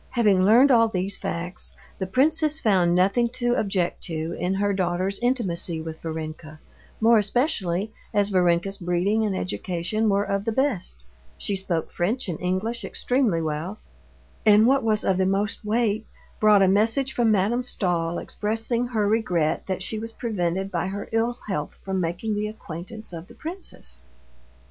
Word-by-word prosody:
Having 205 -6 +4
learned 245 +7 +6
all 230 -2 +6
these 195 -2 -1
facts, 175 +2 -4 0.2
the 190 - -2
princess 305 - +3
found 185 - +3
nothing 200 +6 +3
to 240 -1 0
object 195 -5 -1
to 160 -2 -3
in 180 +2 0
her 200 +1 +1
daughter's 185 +1 -1
intimacy 195 -9 0
with 160 0 -7
Varenka, 155 -1 -6 0.4
more 225 0 +5
especially 205 - 0 0.2
as 205 -1 +2
Varenka's 180 +1 +2
breeding 180 +5 +1
and 200 -3 -1
education 185 +4 -1
were 200 0 +2
of 200 -1 -1
the 225 - 0
best—she 65 - -3
spoke 180 -4 -2
French 215 +9 -1
and 170 -4 -4
English 185 +6 -2
extremely 240 -11 0
well—and 195 +6 -1
what 270 +3 +4
was 215 -2 +1
of 190 - +2
the 190 - +3
most 200 +3 -1
weight, 220 0 0 0.3
brought 210 -2 +6
a - - +5
message 225 +7 +2
from 235 -2 +2
Madame 215 +4 +2
Stahl 175 -8 -1
expressing 225 +3 -2
her 220 -4 0
regret 180 -8 0
that 190 -1 -2
she 215 +3 -3
was 225 +1 -7
prevented 195 -4 -2
by 175 -1 -1
her 200 +1 -5
ill 230 +2 0
health 155 -7 -3
from 190 -1 -1
making 175 +6 -2
the 210 +1 -1
acquaintance 210 0 -8
of 165 +1 -7
the - - -15
princess. 350 +4 -9
200 Hz, 160 wpm, -24 LUFS, 175-225 Hz, 0.4 s, learned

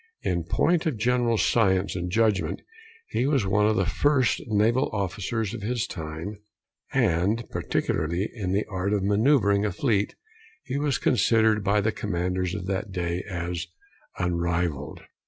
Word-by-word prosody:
In 85 -2 -1
point 165 - +1
of 145 -8 -1
general 120 0 +2
science 100 -4 +2
and 90 0 -3
judgment, 105 0 +1 0.5
he 125 - 0
was 140 -7 +2
one 105 +2 +3
of 110 - +2
the 95 - +2
first 130 - +2
naval 115 +5 +2
officers 100 +2 -2
of - - -6
his 120 +2 -1
time; 80 +5 -6 0.5
and, 110 - +1
particularly 85 +6 -1
in 100 -6 -3
the 100 +2 +1
art 95 0 -2
of 100 -2 +1
manoeuvring 105 -1 +3
a 105 - 0
fleet, 105 0 0 0.5
he 135 +2 -3
was 145 -2 +1
considered 110 -4 +3
by 100 +2 +2
the 110 +2 +1
commanders 90 -2 -2
of - - -5
that 95 +2 -3
day 90 -1 -2
as 85 -1 -3 0.5
unrivalled. 85 -4 -1
100 Hz, 150 wpm, -26 LUFS, 90-115 Hz, 0.5 s, one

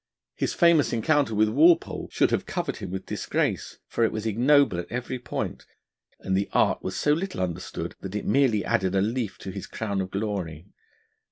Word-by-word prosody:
His - - -2
famous 170 -6 +4
encounter 135 0 +2
with 110 +1 +3
Walpole 160 +9 +3
should - - +2
have - - 0
covered - - -3
him - - -6
with 95 +1 -5
disgrace, - - -2
for 115 - 0
it 115 - +3
was 110 0 -4
ignoble 125 -1 +3
at 85 - -7
every 125 +1 -3
point; 120 - -5 0.5
and 95 - -1
the 100 +1 0
art - - +3
was - - -4
so 150 - +3
little 185 - -3
understood, 90 -1 -4
that 95 +1 -6
it 105 - -3
merely 120 -4 +2
added 95 0 +1
a 95 - +3
leaf 110 0 -2
to 95 - -7
his 100 0 -7
crown 100 -3 -2
of 95 - -4
glory. 95 -6 -3
110 Hz, 190 wpm, -26 LUFS, 95-130 Hz, 0.5 s, famous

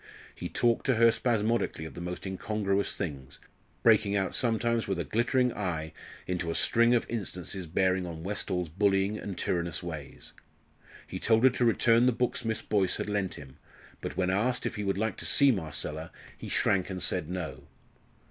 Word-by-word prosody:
He - - -6
talked 120 -1 +1
to 130 - +4
her 115 +1 +6
spasmodically 115 -7 0
of 80 - -8
the 85 - -8
most 90 +2 -5
incongruous 100 +1 -1
things 70 -4 -5 0.5
breaking 105 -3 +4
out 95 -1 0
sometimes 115 -1 +1
with 95 -2 -1
a 85 - -1
glittering 120 - +1
eye 80 -5 -3 0.3
into 90 -2 -2
a 85 - -2
string 120 +1 +4
of 120 - +1
instances 95 -4 -4
bearing 95 +2 +1
on 80 -1 -7
Westall's 95 -2 -2
bullying 100 +3 +1
and 100 -3 -6
tyrannous 85 -1 -1
ways. 80 -5 -7 0.7
He - - -6
told 115 0 +3
her 130 - +7
to 125 0 0
return 115 +1 +4
the - - +5
books 125 +1 -1
Miss 110 -1 -2
Boyce 100 -3 +1
had - - -3
lent 100 -3 -1
him, 65 -2 -12 0.4
but - - -5
when 95 0 +1
asked 120 +6 0
if - - -2
he 105 - -3
would 95 -1 0
like 110 +2 -1
to - - -6
see 140 -1 +5
Marcella 80 - -3 0.2
he - - -8
shrank 95 -1 +1
and 90 -2 -4
said 90 -2 -1
no. 80 -8 -5
95 Hz, 185 wpm, -29 LUFS, 85-115 Hz, 0.7 s, her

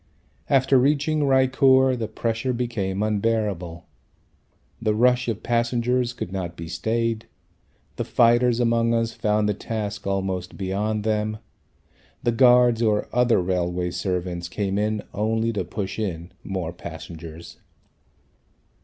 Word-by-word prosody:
After 135 -1 +4
reaching 145 +3 +2
Raichur 130 0 +4
the 115 -3 -3
pressure 115 +3 -2
became 105 -5 -2
unbearable. 105 -5 -1 1.0
The 110 -2 +1
rush 125 +2 +3
of 110 -3 -3
passengers 120 +1 +1
could 105 -6 -6
not 90 -3 -4
be 85 - -6
stayed. 110 +7 -1 0.7
The - - -1
fighters 120 0 +3
among 115 -1 +2
us 115 0 0
found 105 -1 +1
the 105 - +1
task 105 -1 -5
almost 95 -2 -2
beyond 105 +2 -2
them. 110 0 -1 0.9
The 120 - +2
guards 125 -1 +5
or 105 -2 +1
other 125 -3 +3
railway 90 -1 -1
servants 90 -2 -3
came 100 0 -1
in 105 0 -1
only 110 +2 0
to 100 - -1
push 95 +4 -5
in 85 -4 -4
more 90 -4 -4
passengers. 85 -1 -9
110 Hz, 125 wpm, -24 LUFS, 95-120 Hz, 1.0 s, guards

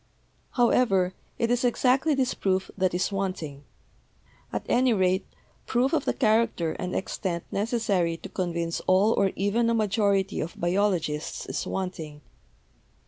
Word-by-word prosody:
"However, 230 -7 +3 0.2
it 230 0 0
is 245 0 +1
exactly 260 +5 +2
this 265 -2 +1
proof 190 -1 -1
that 185 -2 +1
is 180 - 0
wanting. 185 -8 -4 0.9
At - - -3
any 250 0 +3
rate, 190 -1 +1 0.4
proof 255 +5 +1
of 315 - +1
the - - +1
character 220 - +2
and 180 - -3
extent 175 -3 -3
necessary 200 -6 0
to - - -9
convince 170 -2 -2
all 195 +4 +4
or 195 -1 +2
even 215 +5 +1
a 230 - +2
majority 205 -2 +1
of 160 - -5
biologists 175 -4 0
is - - -4
wanting. 165 -6 -4
195 Hz, 140 wpm, -26 LUFS, 180-230 Hz, 0.9 s, all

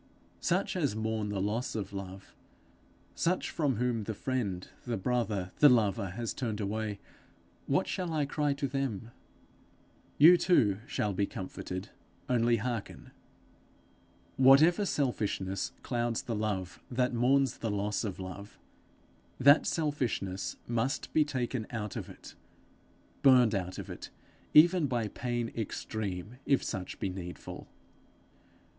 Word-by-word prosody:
Such - - 0
as 105 - 0
mourn 110 -1 -2
the 100 -1 -2
loss 110 +7 -1
of 100 -2 -4
love, 95 0 -8 0.8
such 180 +2 0
from 145 -5 0
whom 115 -1 -1
the 110 - -3
friend, 100 -8 -2 0.2
the 120 -2 -2
brother, 105 -4 -1
the 145 - +9
lover, 105 -4 +2
has 115 +5 -4
turned 115 -4 -3
away 105 0 -2 0.7
what - - +2
shall 180 -3 -2
I 155 -2 +1
cry 145 0 0
to 140 0 -2
them? 125 -5 -3 1.1
You 170 +5 +9
too 110 - +3
shall 105 -7 -1
be 100 +1 0
comforted 95 0 -6 0.4
only 120 -1 +3
hearken: 115 -1 -5 1.3
Whatever 155 +9 +6
selfishness 105 - -1
clouds 120 -2 -1
the 120 - -3
love 95 -4 -3
that 125 0 0
mourns 130 +2 +2
the 115 - -2
loss 105 +1 -1
of 100 -5 -4
love, 95 +2 -8 0.8
that 140 +3 +6
selfishness 125 - -1
must 120 +3 -1
be 155 - +5
taken 125 -5 -3
out 105 -4 -4
of - - -5
it - - -12 0.9
burned 125 -4 +6
out 95 -2 -2
of - - -6
it - - -8 0.5
even 170 0 +7
by 120 -4 -1
pain 120 0 -3
extreme, 105 -1 -4
if 140 - +3
such 95 -4 -5
be - - -1
needful. 90 -1 -8
115 Hz, 130 wpm, -31 LUFS, 100-130 Hz, 1.3 s, the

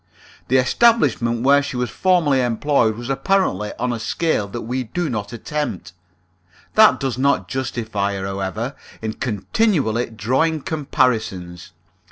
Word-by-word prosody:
The 130 - +3
establishment 125 - +2
where 140 +2 +5
she 140 -3 -5
was 125 -1 -2
formerly 165 -8 +2
employed 120 -1 +1
was 120 0 -7
apparently 135 - 0
on 125 0 -1
a 115 - -4
scale 135 -3 -1
that 115 +4 -6
we 125 +3 -3
do 165 +5 -3
not 105 -2 -4
attempt. 115 - -4 0.8
That 215 0 +6
does 130 -3 -2
not 130 -9 +2
justify 110 -4 -2
her, 95 0 -4
however, 100 +7 -3 0.3
in 110 0 -2
continually 120 - 0
drawing 130 +9 0
comparisons. 110 - -1
125 Hz, 135 wpm, -21 LUFS, 110-145 Hz, 0.8 s, That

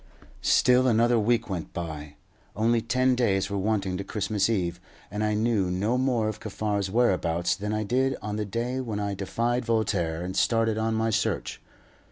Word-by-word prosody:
Still 125 +1 +4
another 120 0 +3
week 115 +1 +1
went 90 -5 -5
by. 75 -4 -6 0.4
Only 115 +3 +2
ten 130 +3 +2
days 100 -6 +1
were 100 - -1
wanting 95 -2 0
to 100 - -4
Christmas 105 0 -1
Eve, 90 -6 -1 0.3
and 105 +2 -2
I 105 0 +1
knew 105 -4 +1
no 100 +7 0
more 125 -4 +1
of 110 -1 -4
Kaffar's 105 -2 -2
whereabouts 90 -6 +1
than 105 +2 -4
I 110 0 -1
did 130 +5 +1
on 105 0 -4
the 105 - -1
day 120 +5 -2
when 115 -5 -3
I 100 -1 -2
defied 115 +6 -1
Voltaire 95 -8 0
and 95 +1 -5
started 115 -1 +2
on 110 0 0
my 110 0 +1
search. 110 - -1
110 Hz, 180 wpm, -26 LUFS, 95-115 Hz, 0.4 s, Still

